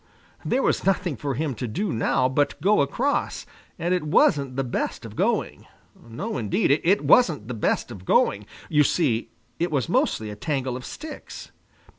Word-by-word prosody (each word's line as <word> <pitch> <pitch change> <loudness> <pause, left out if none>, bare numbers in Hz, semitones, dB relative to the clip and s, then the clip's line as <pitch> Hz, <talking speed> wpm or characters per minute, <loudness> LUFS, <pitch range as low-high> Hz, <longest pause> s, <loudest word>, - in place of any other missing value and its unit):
There 265 - 0
was - - +1
nothing 180 -5 +1
for 140 +2 -3
him 150 +1 -1
to 125 +1 -4
do 180 - -2
now 115 +3 +2
but 140 +2 0
go 200 +4 +3
across, 250 - -1 0.3
and 175 +2 0
it 180 - +1
wasn't 140 -3 +2
the 135 - 0
best 125 - -3
of - - -9
going. - - -1 0.4
No, 115 +3 -4
indeed, 105 +3 +1
it 175 +7 +2
wasn't 155 - +4
the 125 - -4
best 115 +2 -1
of 100 -6 -9
going. 100 +2 +2 0.2
You 150 -1 +4
see, 130 -7 +1 0.3
it 175 +1 0
was 135 -7 0
mostly 110 -1 0
a - - -7
tangle 135 -2 -2
of 125 - -7
sticks. 310 0 -9
140 Hz, 175 wpm, -24 LUFS, 120-175 Hz, 0.4 s, wasn't